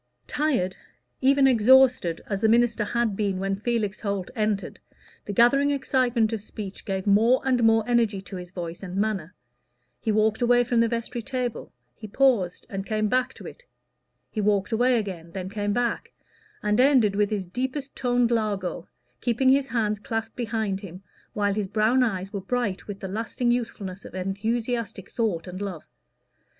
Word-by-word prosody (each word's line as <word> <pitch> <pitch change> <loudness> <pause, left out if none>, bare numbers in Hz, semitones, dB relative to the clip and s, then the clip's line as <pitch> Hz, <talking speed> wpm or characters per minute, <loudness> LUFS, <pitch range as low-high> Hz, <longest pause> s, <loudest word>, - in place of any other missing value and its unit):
Tired, 255 -12 0 0.5
even 275 +1 +4
exhausted, 255 -7 +5
as 200 -1 -3
the 220 - +4
minister 235 -1 +3
had 230 -1 0
been 200 -2 -1
when 195 +1 -1
Felix 215 -1 -2
Holt 200 -3 -3
entered, 215 -3 -1 0.5
the - - -4
gathering 245 +7 +4
excitement 255 -5 +1
of 220 - -3
speech 205 -2 -8
gave 190 -2 -2
more 220 +5 +4
and 250 -3 +2
more 225 0 +4
energy 230 -5 +2
to 195 - -9
his 180 -1 -8
voice 175 -2 -6
and 185 -2 -7
manner; 195 -5 -1 0.6
he 220 - -1
walked 215 +2 +2
away 245 0 +4
from 240 -1 +1
the 230 - +4
vestry 235 +1 -3
table, 250 -1 -4 0.2
he 215 - -10
paused, 210 -6 +1
and 195 -1 -4
came 215 0 -1
back 255 +2 +1
to - - -12
it; - - -10 0.7
he 215 - -2
walked 205 +1 +1
away 245 +2 +3
again, 180 -6 -5
then 185 -1 -5
came 205 -1 -1
back, 240 +2 -1 0.5
and 210 +1 +1
ended 255 -7 +4
with 205 0 +2
his 205 -3 -2
deepest 260 +8 -4
toned 245 -1 +1
largo, 200 -6 -1 0.3
keeping 245 +2 +2
his 270 +1 +4
hands 215 -3 0
clasped 225 +2 -4
behind 220 -4 -2
him, 185 -1 -10 0.3
while 205 -1 +1
his 205 -1 -2
brown 215 +6 +2
eyes 195 -4 -1
were 200 - -3
bright 210 -2 -2
with 200 -1 -6
the 190 - -4
lasting 225 +4 -1
youthfulness 210 -6 -3
of - - -11
enthusiastic 220 +2 -2
thought 210 -8 -1
and 185 +1 -7
love. 190 -6 -5
215 Hz, 170 wpm, -25 LUFS, 195-240 Hz, 0.7 s, exhausted